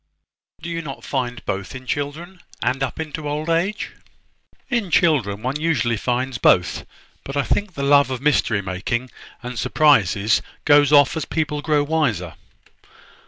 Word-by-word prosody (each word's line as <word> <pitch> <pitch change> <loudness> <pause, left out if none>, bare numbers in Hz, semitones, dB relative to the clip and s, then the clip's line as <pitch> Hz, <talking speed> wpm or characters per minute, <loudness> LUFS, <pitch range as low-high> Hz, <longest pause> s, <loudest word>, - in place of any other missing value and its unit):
"Do - - -5
you 165 0 -3
not 140 -4 -8
find 125 -4 -3
both 95 +6 -4
in 130 0 -9
children, 155 +7 -4 0.2
and 130 +2 0
up 135 +1 -3
into 155 -1 -4
old 155 +3 -2
age?" 185 +6 -1 0.8
"In 230 -6 -1
children, 125 - +2
one 135 +4 -2
usually 125 -8 +1
finds 125 +2 -2
both: 90 -4 +2 0.4
but 135 +1 -5
I 140 - +2
think 205 +2 -1
the 140 - -3
love 140 0 +5
of 130 -2 -3
mystery 120 -7 +1
making 105 +7 -3 0.3
and 125 -1 -5
surprises 110 -8 +3 0.2
goes 145 -1 +5
off 145 +1 +5
as 160 - -2
people 150 -2 -2
grow 150 -1 +2
wiser. 125 - -1
140 Hz, 155 wpm, -21 LUFS, 120-155 Hz, 0.8 s, love